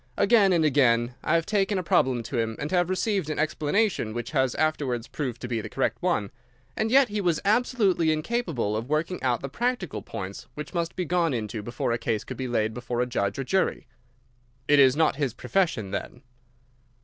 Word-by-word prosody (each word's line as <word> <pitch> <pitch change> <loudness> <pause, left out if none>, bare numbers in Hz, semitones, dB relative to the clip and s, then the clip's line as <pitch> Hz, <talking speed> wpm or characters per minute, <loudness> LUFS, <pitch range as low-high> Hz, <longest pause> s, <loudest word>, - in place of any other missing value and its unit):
Again 210 -5 +5
and 165 -3 +3
again 125 -4 +3
I 160 - +2
have 165 -1 +1
taken 205 -1 +1
a 185 - -1
problem 130 -7 +2
to 120 +1 -3
him, 115 -1 -1
and 150 - -4
have 175 -1 +2
received 185 -3 0
an 155 - -3
explanation 155 - 0
which 120 - -4
has 130 -4 +1
afterwards 140 -7 -1
proved 125 -6 -4
to - - -4
be 115 -2 -2
the - - -7
correct - - -1
one. 100 -1 0 0.4
And 220 - 0
yet 265 0 +5
he 205 0 -2
was 175 -4 +1
absolutely 205 -7 +2
incapable 155 - -1
of 115 +4 -4
working 155 +4 -1
out 125 -3 0
the 135 - -4
practical 235 - -2
points 100 -3 -7
which 150 +3 -7
must 170 -1 -2
be 180 - -2
gone 170 -4 +1
into 110 -1 -4
before 120 +2 -3
a 115 - 0
case 115 -3 -1
could - - -7
be 130 - -3
laid 110 -2 0
before 120 0 -4
a 125 - +2
judge 100 -5 -2
or 135 - -2
jury." 190 +8 0 0.8
"It 145 0 +5
is 130 -1 +6
not 155 -3 +2
his 140 -6 -1
profession, 160 - 0
then?" 100 - -5
145 Hz, 205 wpm, -26 LUFS, 120-180 Hz, 0.8 s, is